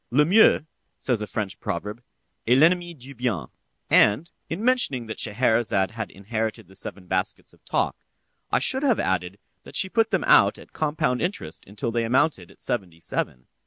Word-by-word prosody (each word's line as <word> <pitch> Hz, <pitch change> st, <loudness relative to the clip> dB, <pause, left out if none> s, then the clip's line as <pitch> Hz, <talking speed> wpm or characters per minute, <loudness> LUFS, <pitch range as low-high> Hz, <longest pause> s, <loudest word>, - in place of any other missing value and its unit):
"Le 150 Hz, +4 st, +4 dB
mieux," 195 Hz, -2 st, +5 dB, 0.3 s
says 120 Hz, -5 st, 0 dB
a 105 Hz, -, -3 dB
French 95 Hz, -2 st, -4 dB
proverb, 105 Hz, +7 st, -4 dB, 0.5 s
"est 125 Hz, +2 st, +5 dB
l'ennemi 175 Hz, +4 st, +4 dB
du 135 Hz, +2 st, -11 dB
bien," 120 Hz, -, -2 dB, 0.4 s
and, 125 Hz, +12 st, +4 dB, 0.2 s
in 190 Hz, +7 st, -3 dB
mentioning 245 Hz, -, +2 dB
that 110 Hz, -, -6 dB
Scheherazade 110 Hz, -3 st, +1 dB
had 110 Hz, -1 st, -5 dB
inherited 110 Hz, +1 st, -4 dB
the 95 Hz, -, -16 dB
seven 95 Hz, 0 st, -5 dB
baskets 95 Hz, 0 st, -2 dB
of -, -, -25 dB
talk, -, -, 0 dB, 0.6 s
I -, -, +4 dB
should 265 Hz, -, +3 dB
have 265 Hz, -6 st, +2 dB
added 95 Hz, +1 st, -1 dB, 0.2 s
that -, -, -12 dB
she 190 Hz, -, +2 dB
put 225 Hz, +2 st, +2 dB
them -, -, 0 dB
out -, -, +5 dB
at -, -, -15 dB
compound 150 Hz, -4 st, 0 dB
interest 180 Hz, +4 st, -3 dB
until 105 Hz, +4 st, -4 dB
they 115 Hz, 0 st, 0 dB
amounted 120 Hz, -, +1 dB
to -, -, -18 dB
seventy 85 Hz, -4 st, -4 dB
seven. 65 Hz, -5 st, -3 dB
115 Hz, 175 wpm, -24 LUFS, 100-155 Hz, 0.6 s, mieux